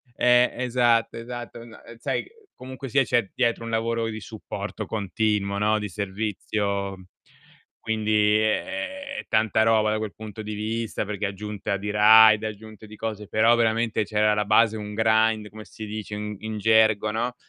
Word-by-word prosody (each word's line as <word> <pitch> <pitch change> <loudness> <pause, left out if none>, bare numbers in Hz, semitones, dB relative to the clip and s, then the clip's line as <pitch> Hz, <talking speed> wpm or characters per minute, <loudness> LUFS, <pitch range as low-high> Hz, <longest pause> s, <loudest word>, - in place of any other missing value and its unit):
Eh, 125 0 +4
esatto, 120 -2 +1
esatto. 120 0 -8
No, 115 -2 -14
uhm, 115 - -12
sai 115 - -2
c - - -18 0.3
comunque 130 +1 -9
sia 135 +2 +3
c'è 120 -6 0
dietro 120 -2 0
un 115 - -5
lavoro 115 0 -1
di 110 0 -5
supporto 105 -1 -7
continuo, 105 -1 -1
no, 105 +1 +2
di 105 - -4
servizio, 100 0 -3 0.7
quindi 105 -1 +2
è 110 0 +1
è 275 - -6
è - - -8
tanta 110 0 +2
roba, 110 -1 +3
da 110 - 0
quel 110 -2 -5
punto 110 0 -9
di 105 0 -5
vista, 110 0 -3
perché 105 0 -3
è - - 0
aggiunta 100 0 -4
di 105 +2 -5
raid, 110 +1 +7
è 110 - -1
aggiunta 110 0 -10
di 110 - -12
cose, 105 -2 -5
però 110 +2 +4
veramente 115 -1 +1
c'è 105 +1 -3
alla 105 0 +2
base 110 +1 +4
un 105 0 -7
grind, 110 -1 +2
come 110 +1 -11
si 110 -2 -9
dice 105 0 -6
in 105 0 -5
in 110 0 -5
gergo, 110 0 +3
no, 120 +3 -2
110 Hz, 180 wpm, -24 LUFS, 105-115 Hz, 0.7 s, raid